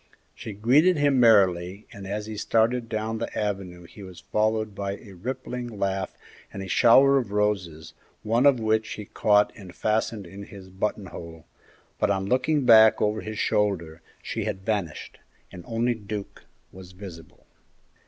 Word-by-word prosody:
She 110 - -8
greeted 140 - +4
him 145 -2 +3
merrily, 95 -4 +3
and 100 -1 -9
as 105 +2 -4
he 110 0 -7
started 115 +3 +1
down 110 +1 -3
the - - -5
avenue 95 -4 -3
he 85 +5 -14
was 95 -2 -10
followed 110 0 0
by 100 0 -4
a 105 - -14
rippling 125 +4 -5
laugh 100 -3 -3 0.3
and 95 - -6
a - - -7
shower 135 +8 +5
of 115 -6 -5
roses, 95 -7 -2 0.3
one 115 +5 +3
of 135 -4 +4
which 110 0 0
he 105 - -7
caught 105 +1 +2
and 95 -4 -12
fastened 110 -1 -1
in 95 +3 -10
his 95 -2 -12
buttonhole, 95 -4 -5 0.5
but - - +2
on 95 -1 0
looking 130 +5 +1
back 110 -2 +7
over 105 +1 0
his 110 0 -6
shoulder 85 -8 -1 0.2
she - - -4
had 95 0 -4
vanished, 100 -8 -3 0.3
and 90 - -10
only 120 +1 0
Duke 105 -2 -8 0.3
was 95 -1 -13
visible. 90 -4 -12
105 Hz, 160 wpm, -25 LUFS, 95-115 Hz, 0.5 s, back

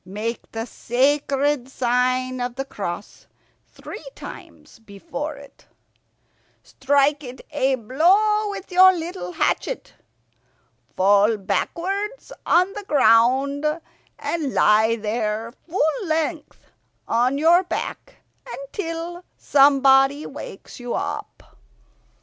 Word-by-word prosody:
Make 210 +5 -5
the 225 0 -4
sacred 275 +2 0
sign 255 0 0
of 245 0 -3
the 270 +1 -4
cross 200 -5 -7 0.4
three - - -10
times - - -12
before 275 +8 -7
it. 280 0 -16 1.0
Strike 285 +2 +1
it 250 0 -9
a 270 -2 +1
blow 385 - +2
with 395 -1 -7
your 375 +1 +7
little 350 +1 -6
hatchet. 475 +8 -2 1.0
Fall 205 +3 +4
backwards 390 - -3 0.2
on 365 +3 +3
the 415 - -7
ground, 265 - +3 0.5
and 305 -6 -3
lie 220 +2 +4
there, 220 +1 -3 0.2
full 345 +4 0
length 315 0 -3 0.4
on 245 +4 +1
your 335 +4 +5
back, 360 - -5 0.3
until 330 - -6
somebody 275 0 +4
wakes - - -10
you 245 -1 -4
up. - - -5
275 Hz, 100 wpm, -22 LUFS, 240-330 Hz, 1.0 s, your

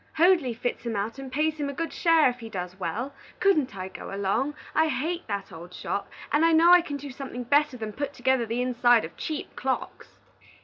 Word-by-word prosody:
Hoadley 330 -7 +4
fits 245 +2 -3
him 230 -2 -3
out 215 +6 -3
and 270 -1 -7
pays 310 +3 0
him 285 -1 -1
a - - -4
good 330 +4 -3
share 330 -3 +4
if 250 0 -2
he 225 -1 -8
does 180 -2 -6
well. 240 +8 -3 0.3
Couldn't 300 - +2
I 185 0 -4
go 190 - -9
along? 200 +9 0 0.2
I 320 0 +3
hate 315 +5 -2
that 200 -2 -4
old 175 +2 -10
shop, 200 - -3 0.2
and 295 +2 +3
I 330 0 +5
know 330 +2 +6
I 355 - +8
can 290 -4 -5
do 280 0 -8
something 255 -1 -6
better 285 +1 +2
than 220 -2 -5
put 285 +4 -3
together 260 -3 +1
the 235 +3 -1
insides 240 -2 +4
of - - -11
cheap 310 -2 -5
clocks." 260 0 -4
260 Hz, 220 wpm, -27 LUFS, 225-305 Hz, 0.3 s, I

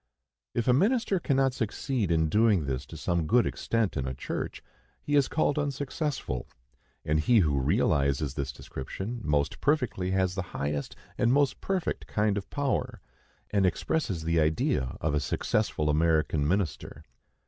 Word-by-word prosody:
If 120 0 0
a 125 - +6
minister 205 - +2
cannot 135 -4 +2
succeed 115 - -2
in 80 -1 +2
doing 105 -2 +3
this 65 0 -3
to 80 - -9
some 85 +1 -1
good 120 +5 +4
extent 115 -4 -1
in 65 -3 -2
a 65 - -3
church, - - -5 0.4
he 145 - -1
is 140 -2 +4
called 150 -2 +1
unsuccessful; 140 - -3 0.6
and 75 +1 +2
he 115 +10 +4
who 75 -5 +1
realizes 70 +1 +1
this 70 -1 -3
description 95 - -6
most 75 -3 0
perfectly 125 -11 +1
has 95 -1 +1
the 95 - -2 0.2
highest 70 0 -2 0.2
and 120 -2 +3
most 140 0 +2
perfect 190 -3 -2
kind 105 -1 +1
of 100 -1 -4
power, 130 -4 -1 0.5
and 100 -2 +2
expresses 95 - 0
the 85 +1 +1
idea 75 -5 +1
of 80 -1 0
a 75 - +2
successful 75 +1 0
American 75 -1 +2
minister. 95 0 -2
95 Hz, 155 wpm, -28 LUFS, -, 0.6 s, a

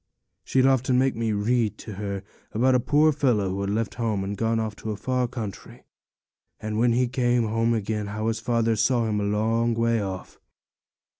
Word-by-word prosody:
She'd 130 0 +2
often 130 -1 +3
make 130 +1 +2
me 115 -1 -1
read 110 +2 0
to 110 - -8
her 100 0 -4 0.3
about 130 +4 +3
a 125 - +4
poor 150 +5 +3
fellow 125 -10 +1
who 95 +1 -3
had 100 - -2
left 110 +1 -1
home 110 -5 -1
and 100 +1 -3
gone 115 +2 0 0.2
to 110 - -6
a 105 - -2
far 125 +3 -1
country, 110 -6 -7 0.8
and 110 0 -3
when 120 0 +3
he 125 +1 +2
came 120 -1 +1
home 115 +1 +1
again, 105 -1 -2
how 110 +1 -4
his 115 0 -1
father 115 -1 +1
saw 120 +2 +2
him 105 -1 0
a - - -1
long 115 +3 +1
way 115 -1 +1
off. 95 -2 -6
115 Hz, 195 wpm, -25 LUFS, 105-120 Hz, 0.8 s, a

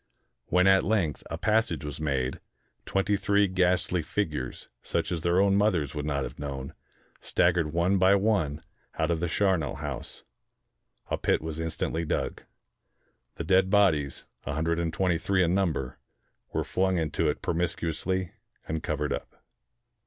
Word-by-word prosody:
When 90 +1 +3
at 95 0 +6
length 95 -8 0
a - - -3
passage 105 -9 +1
was 75 +1 -6
made, 65 -4 -1 0.5
twenty 95 +1 +1
three 100 0 +3
ghastly 90 -1 +1
figures, 75 -7 -3
such - - -2
as 85 -3 -1
their 85 +2 +2
own 100 0 +4
mothers 90 -9 +2
would 75 -1 -3
not 70 -2 0
have - - -7
known, 70 -2 -5 0.5
staggered 85 -3 +2
one 85 +4 +2
by 95 +2 +6
one 95 -8 +1 0.3
out - - +1
of 85 - 0
the 85 - 0
char 95 +1 +2
nel 75 -4 -3
house. - - -6 0.9
A - - 0
pit - - +2
was 80 0 -5
instantly 80 0 -2
dug. 80 - -2 0.9
The - - -4
dead 95 +3 +3
bodies, 85 -9 +2 0.2
a - - -3
hundred 80 +2 0
and 85 -1 -1
twenty 85 -1 +1
three 95 +1 +2
in 85 0 +2
number, 85 -9 -1 0.5
were - - 0
flung 95 0 +1
into 80 -3 0
it - - -3
promiscuously, 85 +2 -1 0.4
and 80 0 -2
covered - - -1
up. - - -6
85 Hz, 160 wpm, -28 LUFS, 75-95 Hz, 0.9 s, at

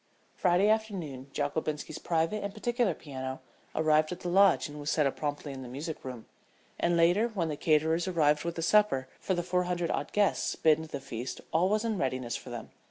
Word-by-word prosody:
Friday 180 +2 +3
afternoon 190 - -1
Jockobinski's 150 +1 -2
private 165 +5 0
and 200 +1 -4
particular 235 -4 0
piano 130 -2 -6 0.4
arrived 155 0 +3
at 180 - -6
the 175 - -3
Lodge 195 0 +5
and 150 0 -9
was 145 0 -3
set 150 -1 +2
up 135 - 0
promptly 145 -1 -3
in 135 - -7
the 130 - -7
music 150 +5 -6
room, 125 -4 -7 0.5
and 170 0 +2
later 175 +7 +4
when 190 -8 -2
the 150 - -2
caterers 160 +3 +2
arrived 150 -5 +2
with 170 0 -3
the 165 - -3
supper 190 -10 +3
for 190 - -1
the 175 - -1
four 180 +1 0
hundred 175 -1 -1
odd - - -2
guests 205 -1 +1
bidden 160 0 +3
to - - -14
the 140 - -3
feast 125 -1 -6
all 175 +4 +3
was 215 +2 +1
in 220 -4 -1
readiness 130 -3 -1
for - - -7
them. - - -7
160 Hz, 210 wpm, -30 LUFS, 145-185 Hz, 0.5 s, Lodge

